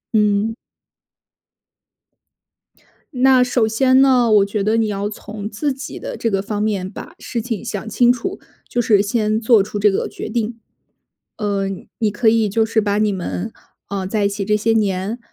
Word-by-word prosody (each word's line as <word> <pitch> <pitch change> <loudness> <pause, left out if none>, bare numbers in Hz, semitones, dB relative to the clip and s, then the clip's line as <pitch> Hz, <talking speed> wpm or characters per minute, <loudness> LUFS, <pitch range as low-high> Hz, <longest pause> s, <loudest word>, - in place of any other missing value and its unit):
嗯。 210 +1 +2 2.6
那 255 0 +5
首 245 -2 +1
先 260 +4 +4
呢， 250 -4 +4
我 205 -2 +5
觉 200 0 -2
得 215 +2 +2
你 225 -1 +2
要 200 -1 -2
从 210 0 -7
自 255 +7 -2
己 270 +1 -7
的 - - -6
这 230 - -1
个 195 -1 +1
方 205 +1 -3
面 200 -4 -1
把 195 - -10
事 235 - -4
情 225 -5 -4
想 205 +1 -5
清 240 +3 +4
楚， 370 +11 -3 0.3
就 240 - 0
是 210 -4 +3
先 215 0 0
做 225 -1 +5
出 205 +1 -4
这 205 0 +4
个 195 - -1
决 - - -7
定。 230 0 -2 0.8
呃， 200 -2 -1 0.3
你 215 -3 +1
可 220 +3 +2
以 220 -1 +3
就 220 +3 +1
是 220 0 +1
把 205 -1 0
你 215 -1 +2
们， 190 +2 -4 0.4
呃， 195 -2 -3
在 205 +2 0
一 - - +3
起 200 0 -3
这 210 +2 +2
些 220 +2 +1
年， 205 0 0
215 Hz, 190 characters per minute, -19 LUFS, 205-230 Hz, 2.6 s, 那